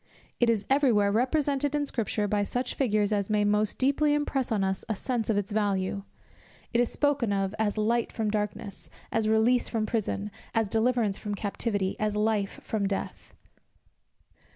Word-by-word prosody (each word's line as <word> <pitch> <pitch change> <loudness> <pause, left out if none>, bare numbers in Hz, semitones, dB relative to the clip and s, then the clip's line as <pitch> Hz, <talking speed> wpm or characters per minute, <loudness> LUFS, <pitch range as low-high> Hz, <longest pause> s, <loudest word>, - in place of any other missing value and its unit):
It 240 - +4
is 215 -3 +1
every 275 -1 +4
where 205 -2 +3
represented 280 +4 +1
in 290 -1 +1
scripture 215 -5 -1
by 205 0 +1
such 245 +5 -2
figures 215 -5 +1
as 200 -1 0
may 210 -1 +2
most 210 0 +1
deeply 290 +3 +3
impress 275 -4 -1
on 205 -3 +1
us 190 0 -1
a 220 - 0
sense 230 +2 -2
of 215 - +2
its 205 +1 -2
value; 200 -2 0 0.7
it 235 - +3
is 245 - 0
spoken 285 -7 +1
of 195 0 0
as 215 -1 0
light 230 +2 +1
from 215 -2 -1
darkness, 210 -1 -4 0.2
as 220 -1 +1
release 225 +3 +3
from 220 -2 -1
prison, 210 -2 -2 0.2
as 225 -3 +2
deliverance 225 -2 +1
from 205 -1 -3
captivity, 205 -1 -2
as 215 -1 0
life 210 -2 0
from 205 -3 -1
death. 195 - -5
215 Hz, 175 wpm, -28 LUFS, 205-240 Hz, 0.7 s, It